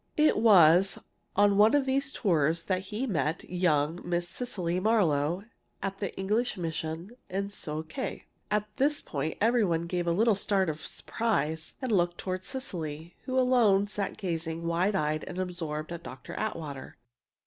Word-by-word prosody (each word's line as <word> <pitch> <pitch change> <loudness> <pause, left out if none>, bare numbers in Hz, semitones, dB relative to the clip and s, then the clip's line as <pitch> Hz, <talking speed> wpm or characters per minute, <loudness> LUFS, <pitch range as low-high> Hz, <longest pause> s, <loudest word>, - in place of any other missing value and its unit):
"It 305 0 +5
was 190 -4 +6 0.4
on 200 0 +4
one 215 +5 +6
of 285 -2 +3
these 275 +2 0
tours 165 - +1
that 185 0 -1
he 220 +5 -2
met 165 - -1
young 170 -2 +1
Miss 175 0 -1
Cecily 180 -6 -2
Marlowe 180 -5 +2 0.4
at 195 0 -3
the 200 - -2
English 210 +5 0
mission 165 +2 -4 0.2
in 200 +1 -2
Sio 155 -6 -4
khé 260 - -5
" - - -43
At 210 0 +1
this 290 +2 +3
point 150 +2 -4
every 230 +2 +3
one 170 -4 +1
gave 175 0 -2
a - - +3
little 220 +6 +4
start 195 -2 +1
of 155 -1 -5
surprise 160 -9 -2
and 255 - -1
looked 175 -3 +2
toward 185 0 -3
Cecily, 170 - -5
who 260 0 -1
alone 240 -6 +4
sat 205 -1 -4
gazing, 165 -3 -3
wide 175 +4 +1
eyed 155 -3 0
and 180 - -7
absorbed, 170 -4 -4
at 170 -1 -5
Dr. - - -9
Atwater. 155 -10 -5
185 Hz, 165 wpm, -29 LUFS, 165-210 Hz, 0.4 s, was